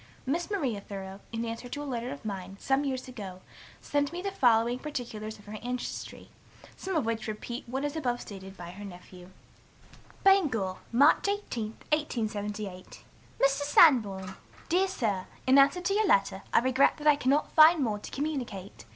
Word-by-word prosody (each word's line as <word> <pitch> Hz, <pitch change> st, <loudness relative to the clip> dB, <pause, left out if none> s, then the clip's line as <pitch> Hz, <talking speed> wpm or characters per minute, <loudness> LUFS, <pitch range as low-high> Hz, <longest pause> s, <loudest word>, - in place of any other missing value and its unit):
Miss 330 Hz, +8 st, -1 dB
Maria 270 Hz, -, -1 dB
Thoreau, 195 Hz, -1 st, -8 dB
in 230 Hz, 0 st, -3 dB
answer 230 Hz, +2 st, -6 dB
to 290 Hz, +3 st, -5 dB
a -, -, -6 dB
letter 245 Hz, -3 st, -3 dB
of 280 Hz, -5 st, -9 dB
mine, 195 Hz, -2 st, -5 dB
some 270 Hz, +1 st, +1 dB
years 260 Hz, -2 st, -3 dB
ago, 195 Hz, -7 st, -8 dB, 0.4 s
sent 285 Hz, 0 st, 0 dB
me 345 Hz, -, -5 dB
the 395 Hz, +2 st, -3 dB
following 240 Hz, -6 st, +3 dB
particulars 235 Hz, -7 st, -5 dB
of 205 Hz, -, -18 dB
her 210 Hz, +1 st, -7 dB
ancestry, 245 Hz, +1 st, -5 dB, 0.5 s
some 380 Hz, -1 st, -4 dB
of 310 Hz, -, +1 dB
which 225 Hz, -1 st, -2 dB
repeat 235 Hz, +3 st, -6 dB
what 265 Hz, +3 st, -2 dB
is 290 Hz, +1 st, -3 dB
above 245 Hz, -6 st, -1 dB
stated 195 Hz, -1 st, -10 dB
by 175 Hz, 0 st, -8 dB
her 200 Hz, +3 st, -10 dB
nephew: 180 Hz, -1 st, -11 dB, 0.9 s
"BANGOR, 260 Hz, -, +3 dB
March 280 Hz, +10 st, +5 dB
18, 400 Hz, -, -2 dB, 0.3 s
1878. 210 Hz, -9 st, -3 dB, 0.4 s
"MR. 275 Hz, -, +6 dB
SANBORN. 255 Hz, -, +4 dB, 0.4 s
"Dear 370 Hz, +3 st, +3 dB
Sir, 215 Hz, -, -2 dB, 0.2 s
In 265 Hz, +2 st, +6 dB
answer 280 Hz, +6 st, +4 dB
to 360 Hz, +2 st, 0 dB
your 425 Hz, 0 st, +2 dB
letter, 195 Hz, -, +2 dB
I -, -, +5 dB
regret 260 Hz, +2 st, +3 dB
that 300 Hz, -, -9 dB
I 300 Hz, -1 st, +7 dB
cannot 280 Hz, +2 st, +1 dB
find 315 Hz, -1 st, +7 dB
more 215 Hz, -4 st, -1 dB
to -, -, -9 dB
communicate. 260 Hz, -10 st, -5 dB
245 Hz, 170 wpm, -29 LUFS, 205-290 Hz, 0.9 s, I